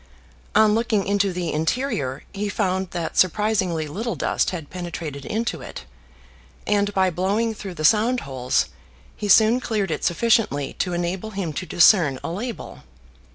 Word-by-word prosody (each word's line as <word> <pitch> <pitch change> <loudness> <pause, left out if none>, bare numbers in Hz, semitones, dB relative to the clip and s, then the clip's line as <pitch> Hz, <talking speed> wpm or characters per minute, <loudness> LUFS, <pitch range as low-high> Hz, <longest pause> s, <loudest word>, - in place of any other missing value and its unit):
On 215 0 +5
looking 220 -3 +1
into 200 -1 +1
the 175 -2 -3
interior 155 - -1
he 205 +1 -2
found 190 -1 -1
that 170 -2 -3
surprisingly 185 -4 +1
little 225 +10 -3
dust - - 0
had 165 -6 -6
penetrated 170 -6 -6
into 230 +2 -2
it, - - -9 0.8
and 205 0 +1
by 190 -1 +3
blowing 200 +6 0
through 195 -4 -8
the 155 -1 -2
sound 225 +7 +3
holes 130 -2 -1 0.5
he 210 - -4
soon 220 +4 +6
cleared 210 -7 -2
it - - -3
sufficiently 175 - +1
to 180 - -1
enable 175 +4 -2
him 190 -6 -4
to 175 +5 -5
discern 170 -6 +5
a - - -3
label. 225 +6 -6
190 Hz, 155 wpm, -23 LUFS, 170-215 Hz, 0.8 s, soon